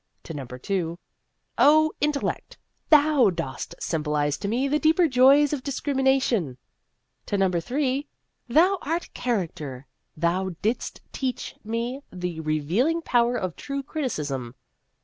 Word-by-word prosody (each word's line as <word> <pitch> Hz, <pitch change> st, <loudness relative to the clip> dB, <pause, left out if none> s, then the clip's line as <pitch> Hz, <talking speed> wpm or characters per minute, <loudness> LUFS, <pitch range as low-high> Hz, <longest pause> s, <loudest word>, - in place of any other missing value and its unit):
' -, -, -46 dB
To 165 Hz, -, -7 dB
number 130 Hz, -4 st, -7 dB
two, 170 Hz, +3 st, -2 dB, 0.3 s
' -, -, -49 dB
O 310 Hz, +1 st, +5 dB
Intellect! 295 Hz, -1 st, -1 dB, 0.3 s
thou 295 Hz, -6 st, +6 dB
dost 165 Hz, -8 st, -5 dB
sym 160 Hz, -2 st, -1 dB
bolize 150 Hz, -1 st, 0 dB
to 200 Hz, -, -3 dB
me 245 Hz, +6 st, 0 dB
the 295 Hz, +2 st, +1 dB
deeper 325 Hz, +3 st, +4 dB
joys 275 Hz, +2 st, +5 dB
of 285 Hz, -, -2 dB
discrimi 275 Hz, 0 st, -2 dB
nation! 235 Hz, -, +2 dB, 0.3 s
' -, -, -50 dB
To 205 Hz, -, 0 dB
number 185 Hz, -3 st, +2 dB
three, 270 Hz, -, -1 dB, 0.2 s
' -, -, -51 dB
Thou 370 Hz, +4 st, +5 dB
art 330 Hz, +4 st, -3 dB
Character. 160 Hz, -, -3 dB, 0.3 s
Thou 175 Hz, +3 st, 0 dB
didst 225 Hz, +4 st, -2 dB
teach 260 Hz, -2 st, -3 dB
me 235 Hz, +5 st, -3 dB
the 180 Hz, -2 st, -4 dB
re 155 Hz, -1 st, 0 dB
vealing 255 Hz, -, 0 dB
power 240 Hz, 0 st, +3 dB
of 185 Hz, -6 st, -3 dB
true 275 Hz, -1 st, -4 dB
criticism.' 145 Hz, -, -3 dB
235 Hz, 150 wpm, -25 LUFS, -, 0.3 s, thou